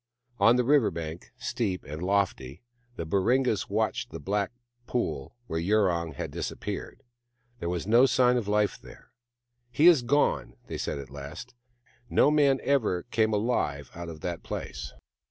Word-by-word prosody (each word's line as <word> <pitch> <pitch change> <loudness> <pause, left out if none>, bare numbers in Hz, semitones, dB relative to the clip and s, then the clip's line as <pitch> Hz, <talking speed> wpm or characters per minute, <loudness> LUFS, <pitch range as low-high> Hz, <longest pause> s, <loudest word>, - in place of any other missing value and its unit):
On 115 +4 +6
the 125 - +3
river 140 -2 +4
bank, 80 -1 -7
steep 115 -6 -2
and 75 +3 -7
lofty, 90 - -1 0.3
the 85 - -4
Baringas 110 +6 +1
watched 110 +4 -1
the - - -7
black 100 0 -1 0.4
pool 75 - -2
where 80 -7 -3
Yurong 85 -3 +1
had - - -5
dis - - -3
appeared. - - -6 0.6
There 85 - -3
was 90 0 -2
no 120 +5 +6
sign 125 -1 +4
of 120 -5 -1
life 105 0 +1
there. - - -15 0.3
" 120 0 -50
He 125 +7 +2
is 170 -6 +8
gone," 120 - +1
they - - -6
said - - -2
at 70 -1 -8
last. 70 - -8 0.3
" - - -33
No 145 - +4
man 140 -3 +4
ever 110 -11 +1
came 110 -1 +2
alive 100 - -1
out 85 0 -7
of 80 -2 -9
that 85 -2 -4
place. - - -6
105 Hz, 170 wpm, -28 LUFS, 85-125 Hz, 0.6 s, is